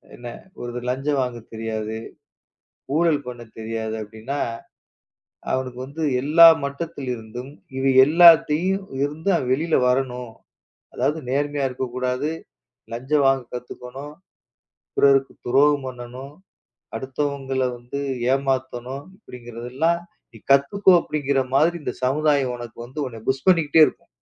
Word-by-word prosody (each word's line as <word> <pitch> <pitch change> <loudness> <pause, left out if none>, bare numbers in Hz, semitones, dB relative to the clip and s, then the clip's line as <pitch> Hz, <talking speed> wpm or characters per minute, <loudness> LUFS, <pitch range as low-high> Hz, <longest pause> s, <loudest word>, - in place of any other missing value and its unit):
என்ன 120 0 -9 0.3
ஒருத்தர் 120 0 -5
லஞ்சம் 135 +2 0
வாங்கத் 120 -2 -5
தெரியாது. 110 -1 -4 1.0
ஊழல் 155 -3 +2
பண்ண 120 -1 -7 0.2
தெரியாது 110 0 -4
அப்டின்னா, 110 +7 -6 1.1
அவனுக்கு 130 -1 -2
வந்து 145 +4 -8 0.2
எல்லா 160 +4 +8 0.2
மட்டத்தில் 140 -1 -5
இருந்தும் 120 +4 -9 0.3
இவை 135 0 +2
எல்லாத்தையும் 170 +3 +5 0.2
இருந்து 155 +6 -2
அவன் 125 - -1
வெளியில 160 +4 0
வரணும். 125 -2 -1 0.6
அதாவது 150 +2 0
நேர்மையா 145 +1 0
இருக்க 130 +1 -4
கூடாது. 130 +3 -1 0.6
லஞ்சம் 135 +4 +1
வாங்கக் 135 -3 +1
கத்துக்கணும். 125 +4 -8 0.8
பிறருக்கு 135 -1 +4
துரோகம் 140 +2 +3
பண்ணனும். 125 +3 -8 0.6
அடுத்தவங்கள 135 +1 -3 0.2
வந்து 120 +4 -7 0.3
ஏமாத்தணும். 130 -1 -2
இப்டிங்கறது 120 - -9
எல்லாம் 165 +5 +2 0.3
நீ - - -12
கத்துக்கோ 140 +9 +4
அப்டிங்கிற 140 -3 -1 0.2
மாரி 165 +5 +4
இந்த - - -3
சமுதாயம் 140 -2 +2
உனக்கு 120 -1 -9
வந்து 130 +5 -9
உன்னை 115 -3 -7
புஷ் 130 0 -1
பண்ணிக்கிட்டே 165 -3 +5
இருக்கும். - - -9
135 Hz, 115 wpm, -23 LUFS, 125-145 Hz, 1.1 s, எல்லா